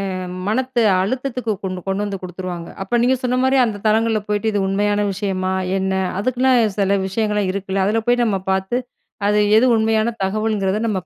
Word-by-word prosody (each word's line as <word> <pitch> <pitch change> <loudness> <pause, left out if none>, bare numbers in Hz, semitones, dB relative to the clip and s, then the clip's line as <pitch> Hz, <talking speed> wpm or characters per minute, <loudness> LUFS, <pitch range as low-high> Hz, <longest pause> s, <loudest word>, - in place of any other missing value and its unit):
அ - - -3 0.3
மன 250 +2 0 0.2
அழுத்தத்துக்கு 250 +2 -2
கொண்டு 185 -1 -3
கொண்டு 195 +2 -1
வந்து 200 -1 -4
குடுத்துருவாங்க. 180 -1 -6
அப்ப 240 +4 0
நீங்க 255 +2 +3
சொன்ன 250 0 +1
மாரி, 265 +1 +3
அந்த 205 -3 -4
தளங்கள்ல 220 0 +2
போய்ட்டு 210 +1 0
இது 205 -2 0
உண்மையான 205 +1 +1
விஷயமா? 190 -1 -2 0.3
என்ன? 190 0 -1 0.3
அதுக்குன்னே 255 +4 +2 0.3
செல 200 0 +2
விஷயங்கள்லாம் 210 -1 0
இருக்குல! 195 0 -2
அதுல 220 +3 +1
போய் 245 0 +3
நம்ம 200 -4 0
பாத்து, 190 +5 0 0.5
அது 210 - +3 0.2
எது 235 - +5
உண்மையான 220 +1 +1
தகவல்ங்கிறத 205 -1 0
நம்ம 195 -4 -1
210 Hz, 170 wpm, -20 LUFS, 195-230 Hz, 0.5 s, எது